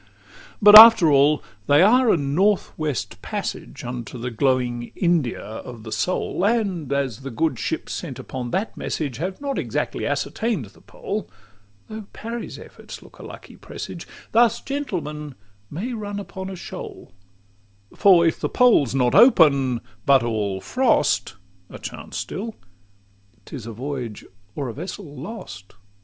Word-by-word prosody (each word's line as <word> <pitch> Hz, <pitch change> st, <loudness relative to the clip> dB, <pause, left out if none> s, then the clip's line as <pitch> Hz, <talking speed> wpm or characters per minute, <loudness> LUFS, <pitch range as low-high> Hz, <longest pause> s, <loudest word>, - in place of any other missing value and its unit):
XXXIX 100 Hz, +2 st, -23 dB
But 210 Hz, 0 st, +9 dB
after 220 Hz, -8 st, +9 dB
all 145 Hz, +1 st, +4 dB, 0.2 s
they 145 Hz, +4 st, +5 dB
are 245 Hz, +4 st, +5 dB
a -, -, +3 dB
North 175 Hz, +8 st, +1 dB
West 150 Hz, -6 st, -4 dB
Passage -, -, -5 dB
Unto 120 Hz, 0 st, -6 dB
the 125 Hz, +1 st, -5 dB
glowing 120 Hz, -1 st, 0 dB
India 170 Hz, -9 st, 0 dB
of 110 Hz, +2 st, -9 dB
the 110 Hz, -, -9 dB
soul; 180 Hz, +4 st, -2 dB
And 200 Hz, -, 0 dB
as 140 Hz, -5 st, -1 dB
the 135 Hz, 0 st, -7 dB
good 145 Hz, +1 st, -1 dB
ships -, -, -3 dB
sent -, -, -6 dB
upon 125 Hz, -2 st, -6 dB
that 195 Hz, -, -2 dB
message 140 Hz, -7 st, -4 dB
Have 185 Hz, +6 st, -4 dB
not 280 Hz, -1 st, -3 dB
exactly -, -, -3 dB
ascertain'd 220 Hz, -, -2 dB
the 95 Hz, -, -19 dB
Pole -, -, -6 dB, 0.6 s
(Though 215 Hz, -2 st, -8 dB
Parry's 230 Hz, +1 st, -6 dB
efforts -, -, -12 dB
look -, -, -18 dB
a -, -, -10 dB
lucky -, -, -11 dB
presage), -, -, -8 dB, 0.2 s
Thus 230 Hz, 0 st, +4 dB
gentlemen 155 Hz, -, -5 dB, 0.3 s
may 215 Hz, -, -5 dB
run 205 Hz, -2 st, -5 dB
upon 190 Hz, -1 st, -7 dB
a 190 Hz, -, -6 dB
shoal; 175 Hz, -, -9 dB, 0.8 s
For 185 Hz, -4 st, +5 dB
if 165 Hz, -, +1 dB
the -, -, -2 dB
Pole's 220 Hz, -, +3 dB
not 125 Hz, -2 st, +2 dB
open, 140 Hz, -, +5 dB, 0.3 s
but 135 Hz, -3 st, +5 dB
all 105 Hz, -5 st, -2 dB
frost 260 Hz, -, +1 dB, 0.3 s
(A -, -, -9 dB
chance -, -, -8 dB
still), 220 Hz, +3 st, -5 dB, 0.9 s
't -, -, -9 dB
is 120 Hz, -5 st, -8 dB
a -, -, -5 dB
voyage 125 Hz, -2 st, -6 dB, 0.3 s
or 135 Hz, -5 st, -3 dB
vessel 160 Hz, -, -8 dB
lost. 130 Hz, -, -9 dB
150 Hz, 150 wpm, -22 LUFS, 125-205 Hz, 0.9 s, But